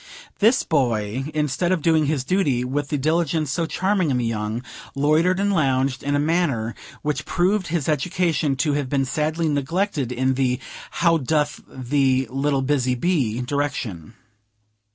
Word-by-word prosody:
This 225 Hz, +5 st, +4 dB
Boy, 120 Hz, -4 st, 0 dB
instead 150 Hz, +3 st, 0 dB
of 175 Hz, -5 st, 0 dB
doing 160 Hz, -3 st, +3 dB
his 145 Hz, -3 st, 0 dB
duty 140 Hz, -6 st, +1 dB
with 140 Hz, +3 st, -2 dB
the 145 Hz, -, -1 dB
diligence 155 Hz, 0 st, 0 dB
so 165 Hz, +3 st, -1 dB
charming 185 Hz, -1 st, 0 dB
in 130 Hz, -, +1 dB
the 120 Hz, -, -1 dB
young, 110 Hz, +1 st, -2 dB, 0.3 s
loitered 155 Hz, +6 st, +2 dB
and 200 Hz, 0 st, +1 dB
lounged, 135 Hz, -5 st, +1 dB
in 145 Hz, 0 st, -1 dB
a -, -, +2 dB
manner 145 Hz, -8 st, 0 dB, 0.3 s
which 150 Hz, 0 st, -1 dB
proved 185 Hz, +2 st, +1 dB
his 165 Hz, -4 st, -1 dB
education 160 Hz, -1 st, 0 dB
to 150 Hz, +2 st, 0 dB
have 140 Hz, -2 st, -1 dB
been 135 Hz, -1 st, +1 dB
sadly 155 Hz, +4 st, -1 dB
neglected 145 Hz, -, -1 dB
in 130 Hz, +2 st, +1 dB
the 130 Hz, -1 st, 0 dB, 0.3 s
"How 165 Hz, -1 st, +2 dB
doth 150 Hz, +2 st, 0 dB
the 130 Hz, 0 st, +1 dB
little 135 Hz, 0 st, 0 dB
busy 130 Hz, -2 st, +1 dB
bee," 125 Hz, -6 st, 0 dB
direction. 125 Hz, -, -3 dB
145 Hz, 155 wpm, -22 LUFS, 130-165 Hz, 0.3 s, This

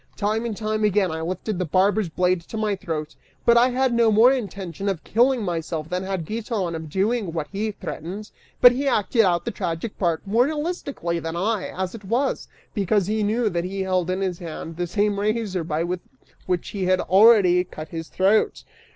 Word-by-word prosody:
Time 215 Hz, +3 st, 0 dB
and 220 Hz, -4 st, -3 dB
time 215 Hz, 0 st, -1 dB
again, 205 Hz, -3 st, +2 dB
I 160 Hz, 0 st, -4 dB
lifted 185 Hz, +4 st, -3 dB
the 185 Hz, -, 0 dB
barber's 190 Hz, +4 st, +2 dB
blade 180 Hz, +1 st, +1 dB
to 220 Hz, -, -6 dB
my 215 Hz, -2 st, 0 dB
throat, 155 Hz, -5 st, -5 dB, 0.3 s
but 235 Hz, -, +6 dB
I 240 Hz, +2 st, +5 dB
had 255 Hz, 0 st, +1 dB
no 235 Hz, -1 st, +4 dB
more 225 Hz, +4 st, +6 dB
intention 200 Hz, -, -3 dB
of 185 Hz, -5 st, -3 dB
killing 245 Hz, +1 st, +2 dB
myself 165 Hz, -3 st, -3 dB
than 180 Hz, 0 st, -1 dB
had 190 Hz, -3 st, -3 dB
Giton 215 Hz, -3 st, -3 dB
of 160 Hz, -1 st, -6 dB
doing 200 Hz, +1 st, 0 dB
what 160 Hz, -3 st, -3 dB
he 210 Hz, +2 st, -2 dB
threatened, 195 Hz, +4 st, -7 dB, 0.3 s
but 245 Hz, -, +10 dB
he 270 Hz, +3 st, -2 dB
acted 225 Hz, -1 st, +2 dB
out 175 Hz, -4 st, +2 dB
the -, -, -2 dB
tragic 170 Hz, +6 st, -4 dB
part 170 Hz, -2 st, 0 dB
more 225 Hz, +5 st, +3 dB
realistically 295 Hz, -, -3 dB
than 165 Hz, 0 st, -5 dB
I, 205 Hz, +3 st, -1 dB
as 185 Hz, 0 st, -4 dB
it 225 Hz, -3 st, -9 dB
was, 240 Hz, +8 st, -1 dB, 0.3 s
because 200 Hz, -1 st, +1 dB
he 215 Hz, +3 st, -1 dB
knew 220 Hz, +3 st, +1 dB
that 170 Hz, -1 st, -1 dB
he 190 Hz, +2 st, -4 dB
held 185 Hz, -2 st, 0 dB
in 185 Hz, +1 st, -1 dB
his 185 Hz, -3 st, -2 dB
hand 165 Hz, -1 st, -7 dB
the 175 Hz, 0 st, -2 dB
same 205 Hz, +3 st, 0 dB
razor 210 Hz, -3 st, -1 dB
with 170 Hz, +3 st, -2 dB, 0.5 s
which 180 Hz, -2 st, -1 dB
he 195 Hz, -3 st, -3 dB
had 185 Hz, 0 st, +3 dB
already 195 Hz, -3 st, +5 dB
cut 155 Hz, -3 st, -9 dB
his 165 Hz, 0 st, -6 dB
throat. 195 Hz, +3 st, +2 dB
195 Hz, 200 wpm, -23 LUFS, 175-220 Hz, 0.5 s, but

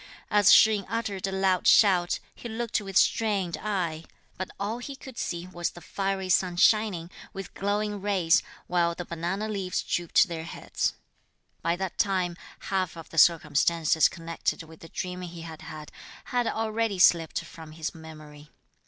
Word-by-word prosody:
As 205 Hz, -2 st, +6 dB
Shih 220 Hz, -1 st, +7 dB
yin 200 Hz, -, -7 dB
uttered 205 Hz, -4 st, -2 dB
a -, -, -3 dB
loud 190 Hz, -1 st, +1 dB
shout, 180 Hz, -4 st, +5 dB, 0.2 s
he 235 Hz, -, -9 dB
looked 225 Hz, -1 st, -2 dB
with 195 Hz, -1 st, -2 dB
strained 200 Hz, -6 st, +2 dB
eye; 175 Hz, -7 st, -2 dB, 0.3 s
but 185 Hz, -, -5 dB
all 210 Hz, +4 st, -2 dB
he 275 Hz, +3 st, -7 dB
could 265 Hz, -2 st, -10 dB
see 170 Hz, 0 st, -3 dB
was 175 Hz, -2 st, -3 dB
the -, -, -12 dB
fiery 195 Hz, +2 st, -3 dB
sun 185 Hz, -1 st, +2 dB
shining, 190 Hz, -4 st, +3 dB, 0.2 s
with 195 Hz, -1 st, -7 dB
glowing 205 Hz, 0 st, -1 dB
rays, 190 Hz, -5 st, +3 dB, 0.2 s
while 170 Hz, -1 st, +1 dB
the 175 Hz, -, -6 dB
banana 175 Hz, +6 st, -3 dB
leaves 195 Hz, -4 st, -2 dB
drooped 175 Hz, +2 st, +2 dB
their 165 Hz, -2 st, -5 dB
heads. -, -, -3 dB, 0.7 s
By 170 Hz, +1 st, +1 dB
that 190 Hz, 0 st, -5 dB
time, 185 Hz, -4 st, +1 dB, 0.3 s
half 185 Hz, -3 st, -2 dB
of 165 Hz, -, -11 dB
the 165 Hz, -, +1 dB
circumstances 160 Hz, 0 st, +4 dB
connected 165 Hz, -1 st, -3 dB
with 160 Hz, 0 st, -14 dB
the 165 Hz, -, -12 dB
dream 180 Hz, 0 st, -5 dB
he 175 Hz, -1 st, -8 dB
had 160 Hz, -1 st, -9 dB
had, 155 Hz, -2 st, -9 dB, 0.3 s
had 245 Hz, -2 st, 0 dB
already 225 Hz, -2 st, -1 dB
slipped 170 Hz, -2 st, +4 dB
from 160 Hz, -3 st, -11 dB
his 160 Hz, 0 st, -4 dB
memory. 155 Hz, -2 st, -12 dB
180 Hz, 165 wpm, -27 LUFS, 165-205 Hz, 0.7 s, Shih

